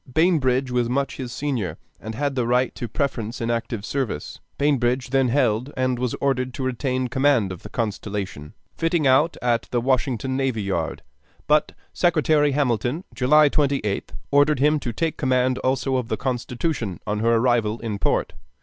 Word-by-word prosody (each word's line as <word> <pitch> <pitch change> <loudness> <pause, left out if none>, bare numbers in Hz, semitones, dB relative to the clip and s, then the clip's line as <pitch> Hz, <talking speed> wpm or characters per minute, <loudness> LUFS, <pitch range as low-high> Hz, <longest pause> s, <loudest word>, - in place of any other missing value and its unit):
Bainbridge 135 -5 +2
was 120 -1 +1
much 135 +2 -1
his 125 -3 -5
senior, 120 - -2 0.2
and 110 +1 -7
had 145 +3 -1
the 125 -3 -1
right 125 +1 +2
to - - -5
a - - -5
preference 115 -2 -2
in 115 0 -1
active 115 -2 -3
service. 130 - -3 0.2
Bainbridge 130 -3 +1
then 135 -1 +3
held 125 0 +1
and 130 -1 0
was 125 -1 -1
ordered 130 -2 -1
to 135 - -4
retain 130 0 -1
command 130 -5 +2
of 90 - -8
the 105 - -10
Constellation, 100 -8 -4 0.2
fitting 165 -2 +1
out 135 +5 +4
at 120 -2 +1
the 120 - 0
Washington 130 0 0
Navy 130 -5 0
Yard; 90 -5 -2 0.4
but 150 0 +2 0.2
Secretary 155 -4 +3
Hamilton, 130 - 0
July 150 +3 +5
28th, 140 -9 0 0.2
ordered 145 0 +4
him 150 +2 +3
to 125 -3 -3
take 160 +8 -2
command 130 -1 +1
also 130 0 0
of 125 -3 -2
the - - -2
Constitution 125 - -2
on 105 0 -1
her 115 +1 +3
arrival 115 -2 +2
in 110 -3 -3
port. - - 0
130 Hz, 170 wpm, -23 LUFS, 115-140 Hz, 0.4 s, July